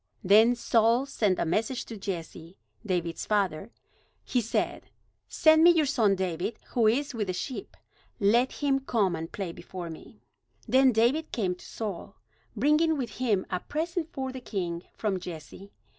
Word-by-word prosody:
Then 220 +5 +6
Saul 235 +2 +2
sent 210 -9 0
a - - 0
message 220 +9 -1
to 230 - -8
Jesse, 175 -3 -6 0.3
David's 175 -5 -2
father. 195 -2 0 0.5
He 250 - 0
said: 230 - -2 0.4
"Send 315 0 +5
me 345 - +9
your 330 -3 +4
son 220 -7 +2
David, 185 +3 -2
who 230 -3 +2
is 275 +6 +1
with 215 -4 -2
the 185 - -1
sheep. 255 +8 -6 0.4
Let 235 +5 +3
him 275 -2 +1
come 215 -9 0
and 165 0 -6
play 190 -4 -4
before 175 0 -8
me." 160 - -13 0.4
Then 265 0 +5
David 245 +8 +1
came 190 -6 0
to 180 - -14
Saul, 205 -2 -6 0.4
bringing 300 +7 +3
with 255 -4 -3
him 220 -7 +1
a 180 - 0
present 325 - -3
for 265 -2 -4
the 260 0 -8
king 175 -7 -3
from 200 -4 -1
Jesse. 180 +3 -9
220 Hz, 160 wpm, -28 LUFS, 185-260 Hz, 0.5 s, me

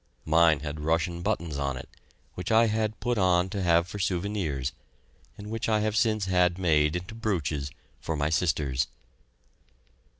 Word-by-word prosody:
Mine 80 -2 +4
had 75 0 -5
Russian 80 +3 0
buttons 80 -4 -2
on 70 -2 -1
it, 65 - -8 0.5
which 90 - -5
I 115 +1 +6
had 110 0 -1
put 120 -2 0
on 90 -1 +3
to 100 - -2
have 85 -1 +3
for 100 - -7
souvenirs 90 -8 -1 0.7
and 105 +1 -8
which 115 0 -2
I 110 -1 +2
have 105 0 0
since 110 -1 +2
had 90 -1 +2
made 80 -4 +2
into 90 +5 -5
brooches 80 -11 -2 0.3
for 80 - -3
my 75 +1 0
sisters. 75 -5 +1
90 Hz, 160 wpm, -27 LUFS, 75-105 Hz, 0.7 s, I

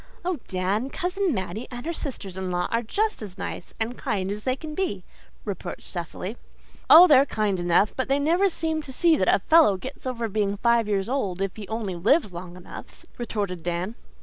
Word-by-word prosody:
"Oh, 360 -3 -1
Dan, 195 +7 -1
Cousin 370 +3 -1
Mattie 195 0 -3
and 245 +1 -7
her 335 - -2
sisters 225 - -5
in 190 -1 -3
law 180 0 0
are 230 - +2
just 425 - -1
as 200 -3 -8
nice 180 - -6
and 230 +2 -2
kind 200 -7 -1
as 210 +1 -5
they 255 -1 +1
can 305 +2 -8
be," 300 - -2 0.4
reproached 200 -3 -5
Cecily. 180 +5 -5 0.5
"Oh, 335 +3 +11
they're 280 -6 +7
kind 210 -6 0
enough, 175 +4 +2
but 260 - -1
they 275 +1 +2
never 340 +7 +3
seem 320 -2 -2
to 285 - -9
see 330 +5 +4
that - - +1
a - - +5
fellow 315 - +6
gets 260 +6 -8
over 235 -2 -2
being 205 -1 -1
five 235 0 +3
years 195 -2 0
old 205 -9 -1
if 195 -1 -2
he 210 -3 -8
only 220 -3 -3
lives 210 - +2
long 175 +1 -8
enough," 180 - -11
retorted 200 -7 -3
Dan. 175 +5 -2
220 Hz, 205 wpm, -25 LUFS, 190-280 Hz, 0.5 s, Oh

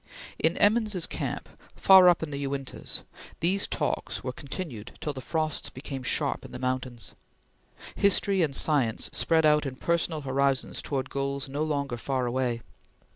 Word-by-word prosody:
In 160 +2 +2
Emmons's 210 -4 +3
camp, - - -4 0.3
far 190 -2 +8
up 175 - +3
in 155 - -4
the 140 - -3
Uintahs, 135 -1 -4 0.4
these 190 +4 +1
talks - - -2
were 125 - -3
continued 135 - -7
till 150 - -3
the 130 - -7
frosts 155 +2 -1
became 135 +1 -7
sharp 125 - 0
in - - -10
the - - -6
mountains. 130 -2 -3 0.8
History 200 -1 +3
and 145 -5 +1
science 135 -8 +2
spread 160 -1 +3
out 150 0 +5
in 135 -3 -4
personal 170 +1 0
horizons 135 0 0
towards 135 -2 -3
goals 140 0 -2
no 140 +2 -3
longer 140 -5 -1
far 130 +1 -1
away. 120 -1 -1
140 Hz, 155 wpm, -28 LUFS, 130-165 Hz, 0.8 s, far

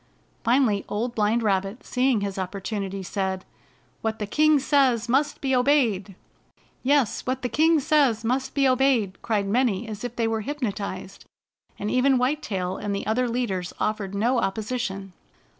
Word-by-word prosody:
Finally 235 -4 +2
Old 235 +4 -2
Blind 220 +1 +1
Rabbit, 195 +2 -1
seeing 250 -3 +1
his 200 -1 -3
opportunity, 195 +1 -4
said: 190 0 -3 0.6
"What 220 0 -2
the 210 - -3
king 305 +7 +4
says 265 -4 +2
must 270 +5 +1
be 265 -2 +1
obeyed!" 245 -8 +2 0.7
"Yes, 275 -3 +2
what 255 0 -2
the - - +1
king 320 +3 +4
says 265 -6 +2
must 260 +3 -1
be 275 -1 +4
obeyed!" 255 -7 +2
cried 210 -3 0
many 225 -1 +1
as 215 0 -7
if 245 -1 -5
they 230 -1 0
were 225 -1 -1
hypnotized, 205 -8 -5 0.5
and 210 - -3
even 260 +1 +3
White 265 +5 +1
Tail 185 -8 -3
and 205 -1 -3
the 200 - -4
other 240 +3 +1
leaders 200 -7 -2
offered 205 -2 -2
no 235 +5 +2
op 195 -3 0
position. 210 -4 -4
225 Hz, 160 wpm, -25 LUFS, 200-260 Hz, 0.7 s, king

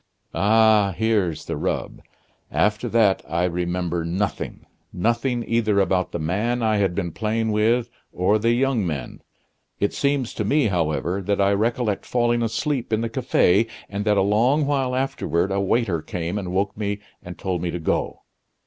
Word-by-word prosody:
"Ah! 105 -2 +4
here's 105 -7 0
the - - -3
rub. - - -3 0.5
After 105 0 0
that 110 -4 +3
I 85 +2 0
remember 90 -1 -1
nothing 95 +5 -3 0.3
nothing 120 +5 -1
either 110 -3 +2
about 95 -2 +1
the - - -3
man 105 +10 -1
I 110 -1 +2
had 95 -3 +1
been 85 -1 -2
playing 110 +3 -1
with 115 +3 +1 0.2
or 100 +4 +2
the 115 +2 +1
young 130 -2 +1
men. 75 -8 -4 0.6
It 100 - 0
seems 140 -4 0
to 110 - -2
me, 135 +2 +2
however, 85 +1 -1
that 100 +1 -1
I 100 0 +3
recollect 110 0 -1
falling 120 -1 +1
asleep 120 +3 -1
in 110 0 +1
the 115 - -2
cafe, 115 -4 +2 0.2
and 100 +1 -3
that 105 -1 +3
a - - +4
long 120 +9 +2
while 135 -3 0
afterward 95 - -1
a 100 0 0
waiter 100 -4 +1
came 85 +5 -3
and 90 -3 -5
woke 100 +2 0
me 100 -1 -2 0.2
and 90 0 -9
told 90 -3 -2
me 90 - -2
to 85 - -3
go. 80 - -2
105 Hz, 170 wpm, -23 LUFS, 90-115 Hz, 0.6 s, Ah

